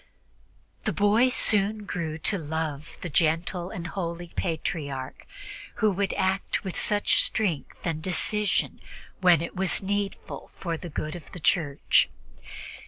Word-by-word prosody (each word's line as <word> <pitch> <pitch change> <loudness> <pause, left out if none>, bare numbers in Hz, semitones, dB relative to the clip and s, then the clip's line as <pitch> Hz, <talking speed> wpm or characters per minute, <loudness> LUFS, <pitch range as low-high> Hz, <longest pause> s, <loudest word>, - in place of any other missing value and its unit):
The - - +1
boy 210 +5 +4
soon 210 -3 +2
grew 165 -5 -3
to 200 - +3
love 155 -2 -3
the - - -3
gentle 170 +3 +1
and 170 -3 -6
holy 170 -1 -4
Patriarch, 150 -6 -3 0.5
who 215 -3 +3
could 200 +1 0
act 190 +1 0
with 190 -3 -4
such 205 -1 +3
strength 180 -10 -1
and 160 -2 -1
decision 205 +4 0 0.4
when 175 -3 +5
it 170 - -6
was 190 +1 +1
needful 200 0 -3
for 170 -3 -3
the 175 +2 -7
good 155 +1 -3
of 175 - -10
the 180 - -6
Church. 150 -3 +3
175 Hz, 135 wpm, -27 LUFS, 160-200 Hz, 0.5 s, when